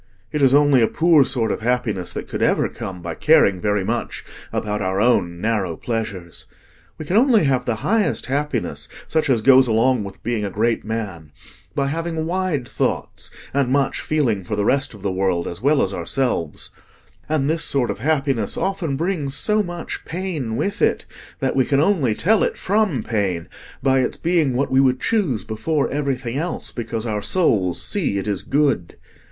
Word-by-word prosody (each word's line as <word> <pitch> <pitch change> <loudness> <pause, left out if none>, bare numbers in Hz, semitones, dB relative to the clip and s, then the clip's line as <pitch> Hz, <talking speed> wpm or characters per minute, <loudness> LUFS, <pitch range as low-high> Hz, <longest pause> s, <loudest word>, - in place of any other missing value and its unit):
It 150 - -2
is 135 0 +5
only 145 -3 +5
a 115 - +4
poor 165 -3 +4
sort 120 -5 0
of - - -3
happiness 115 -6 -1
that - - -5
could - - -5
ever - - +2
come 90 -2 -7
by 85 - -4
caring 100 - +3
very 105 -2 +1
much - - -3 0.3
about 105 -1 -2
our 95 0 -1
own 95 -7 +2
narrow 105 -5 -1
pleasures. 100 -7 -5 0.5
We 155 - -7
can 180 +7 +1
only 235 -5 +5
have 130 -3 +1
the 120 - 0
highest 210 -8 +1
happiness, 145 +3 -2 0.2
such 160 -2 0
as 120 -4 +3
goes 130 +2 +6
along 115 +1 +2
with 100 -1 -10
being 120 -3 -1
a 100 - -2
great 115 +4 0
man, 100 -9 -5 0.4
by 140 - +1
having 160 +2 -2
wide 170 -7 -1
thoughts, - - -2 0.2
and 140 -2 +1
much 140 +1 +1
feeling 125 -11 0
for 105 +4 -3
the 100 0 0
rest 135 -2 +1
of 100 - -14
the 100 - 0
world 95 -2 0
as 85 - -6
well 145 +3 +3
as 100 - -2
ourselves; 85 - -2 0.6
and 150 -3 +1
this 160 +1 0
sort 130 -4 +1
of - - -7
happiness 135 -5 0
often 175 -8 -1
brings 155 -5 -1
so 210 +9 +3
much 175 -3 -6
pain 165 -10 -4
with 200 - -2
it, - - +2 0.3
that 135 - -1
we 130 - +4
can 140 +1 +1
only 150 - +2
tell 210 - +2
it - - 0
from 195 - 0
pain 95 -7 -1 0.4
by 135 -1 +3
its 125 - -1
being 165 -7 +1
what 140 +3 0
we 130 - +4
would 130 -1 +3
choose 185 - 0
before 140 +7 -1
everything 135 -3 -2
else, 170 +2 -4
because 115 -1 -4
our 105 -2 -2
souls 100 - +1
see 165 - 0
it 100 - -3
is 100 -3 -1
good. 135 - 0
130 Hz, 185 wpm, -21 LUFS, 105-155 Hz, 0.6 s, goes